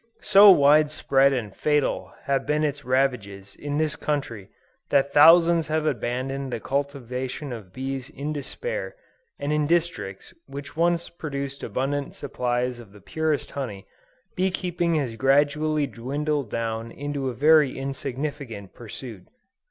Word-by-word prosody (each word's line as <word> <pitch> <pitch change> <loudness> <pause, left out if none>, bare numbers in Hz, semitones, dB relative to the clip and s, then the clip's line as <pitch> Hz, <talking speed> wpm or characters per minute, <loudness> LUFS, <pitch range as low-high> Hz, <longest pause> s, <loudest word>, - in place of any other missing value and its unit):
So 205 0 +8
wide 150 -3 +6
spread 140 -2 +3
and 115 -7 -3
fatal 150 -2 0
have 135 0 -1
been 150 +1 +1
its 145 -1 -2
ravages 125 -7 -1
in 145 0 -4
this 155 -1 0
country, 125 -10 -3 0.4
that 140 0 +2
thousands 165 +2 +6
have 155 0 0
abandoned 135 0 -2
the 115 - -3
cultivation 130 0 -3
of 105 -6 -9
bees 135 +2 -5
in 150 +2 -5
despair, 485 - -5 0.4
and 145 +1 -2
in 150 -1 +1
districts 160 - -1
which 140 +1 -8
once 170 +1 +1
produced 140 -4 -5
abundant 135 +5 -2
supplies 125 -2 -2
of 110 -4 -13
the 105 - -14
purest 160 -2 -2
honey, 115 -9 -5 0.5
bee 190 +1 +1
keeping 175 -2 -1
has 135 -7 -1
gradually 145 +3 +2
dwindled 140 +2 -3
down 115 0 -3
into 140 -1 -3
a 125 - -6
very 150 +1 +4
insignificant 135 - -5
pursuit. 115 -3 -9
140 Hz, 135 wpm, -25 LUFS, 125-150 Hz, 0.5 s, So